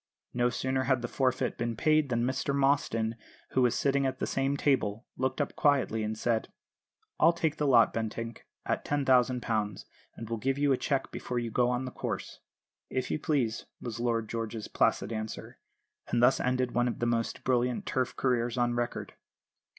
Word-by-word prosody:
No 120 0 +2
sooner 130 +2 -1
had 130 -2 +1
the - - -1
forfeit 130 0 0
been 115 0 -1
paid 155 +3 +3
than 120 -1 +1
Mr 130 +2 -1
Mostyn, 130 -5 +1 0.4
who 130 - +2
was 120 -2 +3
sitting 140 -1 +2
at 130 0 -3
the - - -1
same 135 +1 0
table, 115 -8 +1
looked 130 +2 -1
up 145 - -1
quietly 135 -6 +2
and 110 0 -2
said: 115 0 0 0.7
"I'll 165 +2 +6
take 160 -2 -1
the 150 - 0
lot, 120 -4 +5
Bentinck, 115 +1 -4 0.2
at - - -1
£10,000, 125 -7 +1 0.3
and 115 - -7
will 115 +1 -2
give 135 +5 0
you 145 0 +2
a - - +1
cheque 135 0 -1
before 125 - -4
you 120 -1 -2
go 120 +2 +2
on 125 +1 -1
the 130 - -5
course." - - -5 0.5
"If 130 -1 -2
you - - 0
please," 130 -7 0
was 115 -2 -6
Lord 115 -2 0
George's 115 -1 -4
placid 100 +3 +1
answer; 110 0 -6 0.5
and 120 - 0
thus 125 +2 +5
ended 125 0 0
one 120 0 +2
of 120 - -2
the 120 - -1
most 115 -1 -1
brilliant 125 -1 +1
Turf 130 -1 -1
careers 120 -1 0
on 120 -1 +2
record. 120 0 -3
125 Hz, 185 wpm, -30 LUFS, 115-135 Hz, 0.7 s, I'll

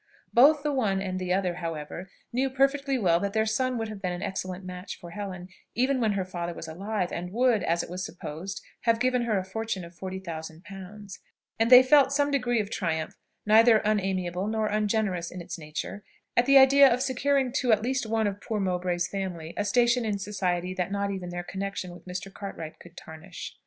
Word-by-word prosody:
Both 285 +4 +6
the 295 -1 0
one 210 -8 +1
and 185 -1 -3
the 180 -1 -3
other, 180 -2 0
however, 165 +2 -5 0.2
knew 265 +2 +1
perfectly 275 +1 +1
well 175 -7 +3
that 200 +1 -2
their 220 0 +2
son 255 +3 0
would 225 -1 -2
have 215 -2 -8
been 180 -2 -1
an 175 0 -4
excellent 185 0 -4
match 180 +1 -7
for 170 - -10
Helen, 185 -2 -6 0.3
even 260 +2 +2
when 220 -3 +2
her 190 -2 -1
father 175 -2 -5
was 165 - -7
alive, 190 +3 -3
and 180 +1 -4
would, 240 0 +3
as 170 +1 0
it - - -9
was 185 +1 -4
supposed, 175 +2 -6 0.2
have 230 -1 +3
given 250 0 +1
her 220 -3 +1
a 190 - -1
fortune 195 -2 -4
of 170 - -13
forty 190 +2 -6
thousand 160 -2 -7
pounds; 195 +1 -10 0.4
and 225 +1 +3
they 250 0 +10
felt 275 0 +5
some 285 0 +2
degree 245 -4 +1
of 210 0 -3
triumph, 160 -4 -2 0.3
neither 225 +2 +7
unamiable 190 -3 0
nor 220 0 0
ungenerous 210 -4 0
in 180 - -8
its 175 0 -7
nature, 160 +6 -6 0.3
at 240 +1 +3
the 275 0 +7
idea 275 +1 +8
of 250 +2 +1
securing 270 0 +1
to 265 -2 0
one 220 - +6
at 215 - -9
least 260 -1 -1
of 215 -3 0
poor 220 -2 -2
Mowbray's 180 -2 0
family 180 -5 -5
a - - 0
station 240 +3 +3
in 210 -2 -1
society 185 -3 -2
that 185 0 -2
not 200 0 -1
even 185 -2 -5
their 175 0 -4
connexion 195 0 -4
with 175 - -14
Mr. 185 +2 -6
Cartwright 165 -6 -7
could 175 0 -15
tarnish. 160 0 -9
200 Hz, 210 wpm, -27 LUFS, 180-235 Hz, 0.4 s, they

